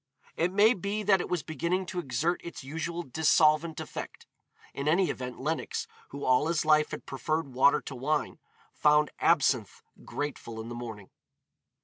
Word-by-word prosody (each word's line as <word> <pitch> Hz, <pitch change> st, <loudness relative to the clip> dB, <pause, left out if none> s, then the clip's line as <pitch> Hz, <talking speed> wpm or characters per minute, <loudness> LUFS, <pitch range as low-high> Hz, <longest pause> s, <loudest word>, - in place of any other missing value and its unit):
It 170 Hz, +2 st, +1 dB
may 210 Hz, +4 st, +5 dB
be 200 Hz, +1 st, -3 dB
that 195 Hz, -2 st, +4 dB
it -, -, -6 dB
was 180 Hz, -3 st, -1 dB
beginning 170 Hz, +5 st, -1 dB
to 180 Hz, 0 st, -4 dB
exert 160 Hz, +4 st, -1 dB
its 170 Hz, -, -8 dB
usual 165 Hz, +5 st, -4 dB
dissolvent 155 Hz, +2 st, +3 dB
effect. -, -, -7 dB, 0.5 s
In 140 Hz, +1 st, -4 dB
any 175 Hz, +4 st, +3 dB
event 125 Hz, -1 st, -6 dB
Lenox, 155 Hz, +4 st, -2 dB, 0.2 s
who 140 Hz, +1 st, -6 dB
all 130 Hz, +4 st, +3 dB
his 165 Hz, -2 st, 0 dB
life 150 Hz, 0 st, +4 dB
had 155 Hz, -, -7 dB
preferred 155 Hz, +2 st, -2 dB
water 140 Hz, +3 st, +4 dB
to -, -, -8 dB
wine, 145 Hz, +4 st, -1 dB, 0.3 s
found 150 Hz, 0 st, +3 dB
absinthe 135 Hz, -, +2 dB, 0.2 s
grateful 130 Hz, -6 st, -5 dB
in 110 Hz, +1 st, -6 dB
the -, -, -5 dB
morning. 110 Hz, -5 st, -8 dB
155 Hz, 160 wpm, -29 LUFS, 135-170 Hz, 0.5 s, may